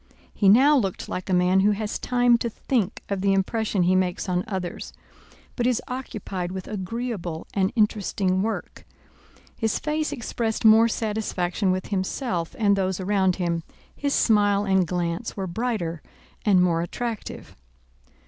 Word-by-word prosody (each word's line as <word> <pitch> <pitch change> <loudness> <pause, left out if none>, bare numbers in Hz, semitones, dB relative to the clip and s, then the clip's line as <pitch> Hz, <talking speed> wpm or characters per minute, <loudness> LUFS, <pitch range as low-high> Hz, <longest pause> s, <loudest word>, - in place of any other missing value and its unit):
He 200 - +3
now 270 +8 +6
looked 195 -9 -1
like 185 +1 -5
a - - 0
man 180 +1 +4
who 205 +2 +4
has 210 +1 -3
time 245 -1 +3
to 235 - -1
think 220 -3 -2
of 200 -2 -2
the 195 0 +3
impression 200 0 0
he 185 +2 +3
makes 185 0 0
on 180 -1 0
others, 190 -4 -5 0.6
but 240 -1 0
is 250 -2 +2
occupied 205 -8 -5
with 190 -1 -6
agreeable 205 -4 -4
and 190 -1 +1
interesting 200 -4 +1
work. 220 +2 -4 0.7
His 220 -1 0
face 305 0 -1
expressed 225 -2 -3
more 220 +1 +7
satisfaction 210 -4 -1
with 185 0 -3
himself 190 - -2
and 205 -3 +3
those 190 -1 -1
around 190 -1 +2
him, 170 -2 -1 0.3
his 285 -1 -1
smile 205 -2 +3
and 190 -2 +2
glance 175 +6 -3
were 195 - -2
brighter 185 -5 -2 0.4
and 190 -4 +4
more 170 -2 +2
attractive. 225 +5 -5
200 Hz, 150 wpm, -24 LUFS, 185-225 Hz, 0.7 s, more